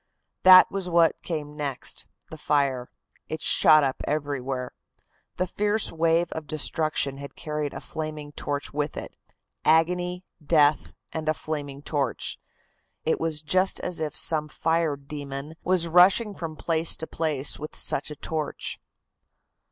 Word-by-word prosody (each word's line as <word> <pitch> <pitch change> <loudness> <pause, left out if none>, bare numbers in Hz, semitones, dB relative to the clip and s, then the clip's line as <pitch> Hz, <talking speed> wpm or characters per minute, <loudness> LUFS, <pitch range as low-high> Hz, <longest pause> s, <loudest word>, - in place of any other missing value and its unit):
"That 185 0 +9
was 190 -2 -3
what 170 -2 +3
came 150 -3 -5
next 145 -3 -4 0.2
the 160 - -7
fire. 140 -5 0 0.4
It 160 - -3
shot 155 0 +5
up 135 -1 -1
everywhere. 135 -4 -2 0.7
The 185 - +1
fierce 210 +3 0
wave 165 +1 +1
of 160 -2 -6
destruction 155 -2 +2
had 140 -1 -9
carried 150 -2 -3
a - - -7
flaming 155 -2 -6
torch 145 -1 -4
with 150 +1 -2
it - - -7 0.5
agony, 180 +3 +2 0.2
death 150 -1 +3 0.2
and 160 -1 -3
a 155 - +1
flaming 145 -3 -5
torch. 145 -2 -2 0.7
It 160 - +1
was 160 -2 -3
just 185 +5 +2
as 180 -2 -3
if 150 -2 -3
some 155 -2 +2
fire 160 0 0
demon 140 +1 -7
was 180 -2 +2
rushing 185 +6 +5
from 165 -4 -6
place 165 0 +1
to 160 - -4
place 150 -4 0
with 155 +1 -7
such 140 - 0
a 150 - -7
torch." 155 +1 -4
155 Hz, 145 wpm, -26 LUFS, 145-165 Hz, 0.7 s, That